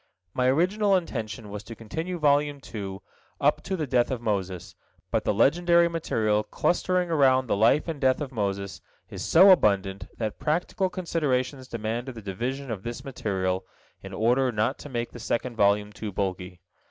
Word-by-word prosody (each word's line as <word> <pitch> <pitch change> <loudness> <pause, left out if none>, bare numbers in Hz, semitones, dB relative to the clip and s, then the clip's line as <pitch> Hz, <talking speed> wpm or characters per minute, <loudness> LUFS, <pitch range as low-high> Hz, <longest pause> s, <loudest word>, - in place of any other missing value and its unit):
My 125 0 +1
original 190 +9 +3
intention 110 - -5
was 105 0 -5
to 115 +2 -8
continue 160 +12 -5
Volume 145 -1 +2
II 95 -3 -5 0.4
up - - +2
to 195 - -3
the 155 - -1
death 125 -3 +2
of 130 -3 -2
Moses, 95 -6 -3 0.4
but - - 0
the - - +3
legendary 170 - +4
material 110 -10 0
clustering 180 +7 0
around 130 -4 +4
the 115 - 0
life 115 +10 +3
and 160 -4 -4
death 130 -1 +3
of 145 -3 -4
Moses 100 -4 -3 0.3
is - - -5
so 190 +4 +7
abundant 100 - +2
that 110 -2 -3
practical 180 +5 0
considerations 140 -7 -1
demanded 115 +3 -4
the 115 - -8
division 125 +7 -4
of 105 -4 -4
this 120 +5 -6
material, 95 -7 -2 0.4
in - - -9
order 125 +3 +2
not 110 +4 0
to 145 - -9
make 120 -2 -3
the 120 - -10
second 120 +1 -2
volume 105 0 +2
too 105 0 -6
bulky. 90 -2 -4
120 Hz, 170 wpm, -26 LUFS, 105-150 Hz, 0.4 s, so